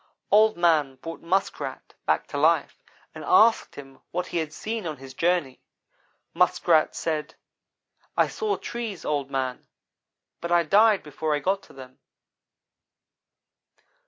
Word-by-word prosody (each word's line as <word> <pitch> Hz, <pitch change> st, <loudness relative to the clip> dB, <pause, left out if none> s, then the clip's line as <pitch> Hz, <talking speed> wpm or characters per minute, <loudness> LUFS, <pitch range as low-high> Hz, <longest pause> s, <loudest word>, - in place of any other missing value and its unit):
"Old 215 Hz, 0 st, +5 dB
man 155 Hz, -6 st, +2 dB
brought 165 Hz, +5 st, -8 dB
Muskrat 190 Hz, +4 st, -2 dB
back -, -, +2 dB
to -, -, -4 dB
life, -, -, +2 dB, 0.3 s
and -, -, -9 dB
asked 370 Hz, -, +4 dB
him 135 Hz, -1 st, -12 dB
what 180 Hz, +1 st, -2 dB
he 175 Hz, -, -2 dB
had 155 Hz, -2 st, -3 dB
seen 220 Hz, +3 st, -4 dB
on 155 Hz, -2 st, -5 dB
his 135 Hz, 0 st, -11 dB
journey. 165 Hz, -4 st, 0 dB, 0.7 s
Muskrat 170 Hz, -2 st, +3 dB
said: 155 Hz, -1 st, -3 dB, 0.8 s
'I -, -, +4 dB
saw 430 Hz, -2 st, -2 dB
trees, 230 Hz, -6 st, -6 dB
Old 145 Hz, -2 st, -1 dB
man, 130 Hz, -2 st, -3 dB, 0.7 s
but 170 Hz, -, -5 dB
I 175 Hz, -1 st, +4 dB
died 205 Hz, +5 st, +4 dB
before 150 Hz, +1 st, -2 dB
I -, -, -1 dB
got 195 Hz, +5 st, 0 dB
to -, -, -18 dB
them.' 130 Hz, -1 st, -13 dB
165 Hz, 135 wpm, -25 LUFS, 145-195 Hz, 0.8 s, Old